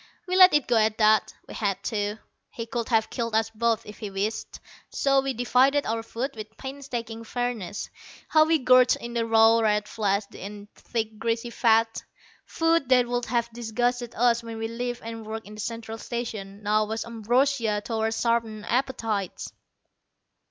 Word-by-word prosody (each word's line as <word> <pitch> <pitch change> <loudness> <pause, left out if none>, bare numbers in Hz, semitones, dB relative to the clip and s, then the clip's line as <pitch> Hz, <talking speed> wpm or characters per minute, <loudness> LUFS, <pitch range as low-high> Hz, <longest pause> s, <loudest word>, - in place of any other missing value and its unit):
We 365 - 0
let 370 -3 +8
it 295 - +3
go 235 - +2
at 220 0 +2
that. 215 -1 +4 0.2
We - - -9
had 200 -2 -2
to. 210 -2 -2 0.3
He 230 - -6
could 230 0 -4
have 225 -2 +2
killed 230 -3 -2
us 225 0 +1
both 225 0 0
if 210 - -11
he 210 - -5
wished. 200 +3 -3 0.3
So 275 -1 +2
we 270 0 -2
divided 260 +4 +3
our 225 +1 -1
food 235 +4 -4
with 215 0 -9
painstaking 245 -5 -6
fairness. 230 -5 -3 0.4
How 310 -1 +5
we 325 0 +4
gorged 255 -2 +5
on 235 0 -7
the 230 -1 0
raw 225 0 +6
red 210 -2 +1
flesh 205 -2 0
and 205 +1 -8
thick 220 -2 -4
greasy 230 +1 -1
fat! 225 -1 +2 0.5
Food 330 -4 +1
that 250 -2 +5
would 245 0 -1
have 235 0 -1
disgusted 240 +1 -2
us 235 0 +3
when 230 -1 -7
we 225 0 -2
lived 245 +1 -4
and 225 0 -6
worked 220 +1 -6
in 210 - -11
the 215 - -6
Central 225 0 -5
Station, 215 -5 -5
now 215 +1 +2
was 220 +1 -4
ambrosia 230 -1 +1
to 235 - -4
our 220 0 0
sharpened 225 -2 -1
appetites. 225 -7 -2
230 Hz, 175 wpm, -26 LUFS, 215-245 Hz, 0.5 s, let